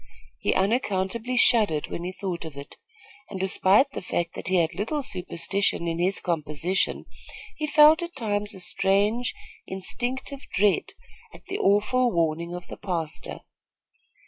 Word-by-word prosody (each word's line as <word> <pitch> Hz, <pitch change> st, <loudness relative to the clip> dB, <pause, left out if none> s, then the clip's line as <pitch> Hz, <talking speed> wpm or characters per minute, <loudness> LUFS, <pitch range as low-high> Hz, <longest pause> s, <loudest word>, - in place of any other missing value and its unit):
He -, -, 0 dB
unaccountably 220 Hz, +3 st, 0 dB
shuddered 210 Hz, -12 st, +4 dB
when 170 Hz, -, -4 dB
he 180 Hz, -, -3 dB
thought 185 Hz, -2 st, -4 dB
of 155 Hz, -4 st, -9 dB
it, 140 Hz, -, -9 dB, 0.5 s
and, 190 Hz, -, -6 dB
despite 190 Hz, +7 st, +4 dB
the -, -, -5 dB
fact 170 Hz, -2 st, -2 dB
that -, -, -7 dB
he 190 Hz, -, +1 dB
had 170 Hz, -1 st, +2 dB
little 225 Hz, -, -2 dB
superstition 185 Hz, -2 st, -1 dB
in 165 Hz, 0 st, -2 dB
his 185 Hz, +3 st, +2 dB
composition, 165 Hz, +1 st, -1 dB, 0.5 s
he 305 Hz, -, -3 dB
felt 305 Hz, +2 st, +6 dB
at 345 Hz, 0 st, -6 dB
times 205 Hz, -2 st, -2 dB
a -, -, -10 dB
strange 205 Hz, +6 st, +1 dB, 0.3 s
instinctive 250 Hz, +8 st, -2 dB
dread 200 Hz, 0 st, +2 dB, 0.4 s
at -, -, -15 dB
the 395 Hz, +1 st, -4 dB
awful 235 Hz, +5 st, +3 dB
warning 170 Hz, 0 st, 0 dB
of 180 Hz, 0 st, -7 dB
the -, -, -9 dB
pastor. 170 Hz, -6 st, -4 dB
195 Hz, 145 wpm, -25 LUFS, 175-235 Hz, 0.5 s, felt